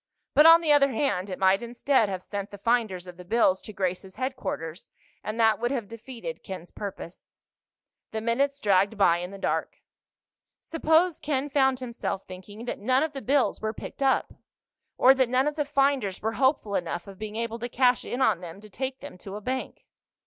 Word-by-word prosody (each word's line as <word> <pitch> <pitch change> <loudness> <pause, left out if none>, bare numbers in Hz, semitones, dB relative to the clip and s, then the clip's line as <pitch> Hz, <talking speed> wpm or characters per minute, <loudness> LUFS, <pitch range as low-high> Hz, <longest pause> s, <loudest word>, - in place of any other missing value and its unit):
But, 300 +2 +7
on 330 +1 +9
the 315 -3 +2
other 285 -1 +5
hand, 205 -7 0
it 185 - -4
might 190 +1 +3
instead 240 -1 +1
have 185 -2 -4
sent 200 0 -5
the 205 - -10
finders 210 -4 0
of 180 -1 -11
the 180 - -10
bills 190 -1 +2
to - - -10
Grace's 190 -1 -3
headquarters, 255 - -4 0.3
and 215 +2 -4
that 220 -1 +4
would 240 +1 0
have 245 -6 -2
defeated 235 +2 -8
Ken's 185 -3 -8
purpose. 190 -3 -8 0.7
The 220 - -3
minutes 275 +5 0
dragged 200 0 +2
by 175 -4 +4
in 175 +1 -5
the 200 - -9
dark. - - -2 0.8
Suppose, 325 +1 +2
Ken 290 -1 -2
found 265 -2 +2
himself 235 -5 -4
thinking, 205 +5 -10
that - - -4
none 255 +6 +2
of 315 -1 -3
the 270 - -6
bills 275 +1 +1
were 220 0 -2
picked - - -9
up? 270 -1 +2 0.6
Or 260 - +7
that 260 -2 +1
none 255 +2 +2
of 300 - 0
the 295 -1 -1
finders 275 -8 +1
were 220 - -1
hopeful 260 -4 +1
enough 175 -2 -2
of 195 -2 -12
being 215 0 -6
able 230 0 -3
to 240 +1 -4
cash 250 0 +3
in 255 +2 -1
on 180 - +2
them 175 +1 -9
to 215 -1 -14
take 260 +5 -4
them 285 -10 -10
to 195 +1 -8
a - - -5
bank? 260 +4 -4
230 Hz, 200 wpm, -26 LUFS, 195-265 Hz, 0.8 s, on